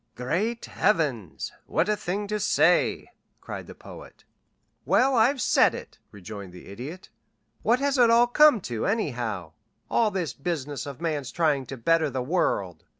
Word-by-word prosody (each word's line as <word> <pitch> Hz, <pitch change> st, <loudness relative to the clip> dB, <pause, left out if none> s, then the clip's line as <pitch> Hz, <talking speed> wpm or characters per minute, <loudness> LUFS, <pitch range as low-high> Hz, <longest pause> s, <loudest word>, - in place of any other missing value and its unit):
"Great 190 Hz, -, -2 dB
Heavens! 145 Hz, -, -1 dB, 0.2 s
What 175 Hz, -, +1 dB
a 210 Hz, -, +2 dB
thing 200 Hz, +1 st, -3 dB
to 210 Hz, 0 st, -1 dB
say!" 210 Hz, -, +2 dB, 0.3 s
cried -, -, -8 dB
the -, -, -11 dB
Poet. -, -, -13 dB, 0.6 s
"Well, 265 Hz, +2 st, +3 dB
I've 250 Hz, +4 st, +3 dB
said -, -, +3 dB
it," -, -, -10 dB
rejoined 100 Hz, -1 st, -9 dB
the 90 Hz, -, -12 dB
Idiot. 140 Hz, -, -8 dB, 0.5 s
"What 235 Hz, +2 st, +3 dB
has 280 Hz, 0 st, 0 dB
it 240 Hz, -2 st, +6 dB
all 235 Hz, +1 st, +6 dB
come 285 Hz, -1 st, +5 dB
to, 120 Hz, -8 st, -3 dB
anyhow 120 Hz, -, -2 dB, 0.4 s
all 225 Hz, -2 st, +3 dB
this 180 Hz, -, -3 dB
business 145 Hz, -3 st, -4 dB
of 140 Hz, +2 st, -8 dB
man's 150 Hz, -5 st, -2 dB
trying 150 Hz, -6 st, 0 dB
to 135 Hz, -, -7 dB
better 160 Hz, +5 st, +2 dB
the 130 Hz, -1 st, -3 dB
world? 100 Hz, -, -1 dB
165 Hz, 155 wpm, -26 LUFS, -, 0.6 s, it